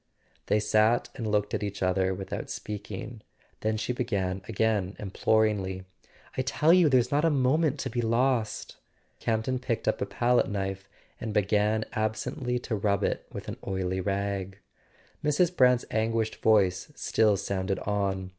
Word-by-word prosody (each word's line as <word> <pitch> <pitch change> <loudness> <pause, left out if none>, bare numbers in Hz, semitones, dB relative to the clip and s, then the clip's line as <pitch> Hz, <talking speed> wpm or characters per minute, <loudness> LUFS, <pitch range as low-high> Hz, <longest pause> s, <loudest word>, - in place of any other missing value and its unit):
They 105 - +3
sat 110 +2 +3
and 115 -5 -4
looked 105 0 0
at - - -1
each 100 -1 -3
other 95 0 +2
without 95 +1 -5
speaking; 105 +2 -6 0.4
then 110 0 0
she 125 - -2
began 100 -7 -1
again 105 -3 0
imploringly: 100 -2 0 0.5
"I - - +1
tell 150 +5 +3
you 180 -4 +6
there's 125 -2 +3
not 145 +2 +2
a 165 - +4
moment 145 +2 +2
to 130 - -3
be 120 - -1
lost! 115 -1 0 0.2
" - - -40
Campton 115 +3 0
picked 120 -2 -3
up - - +1
a - - 0
palette 120 +1 +2
knife 95 -1 -3 0.3
and 110 -2 -4
began 105 +2 +2
ab¬ 110 0 0
sently 125 +1 -3
to 115 - -2
rub 100 -1 +1
it - - -1
with - - -7
an - - -5
oily 95 -1 -1
rag. 100 0 -2 0.7
Mrs. 165 +4 +2
Brant's 125 -3 +4
anguished 110 0 0
voice 100 +2 +2
still 110 -3 +2
sounded 95 0 -2
on. 95 -2 -1
110 Hz, 160 wpm, -28 LUFS, 100-125 Hz, 0.7 s, you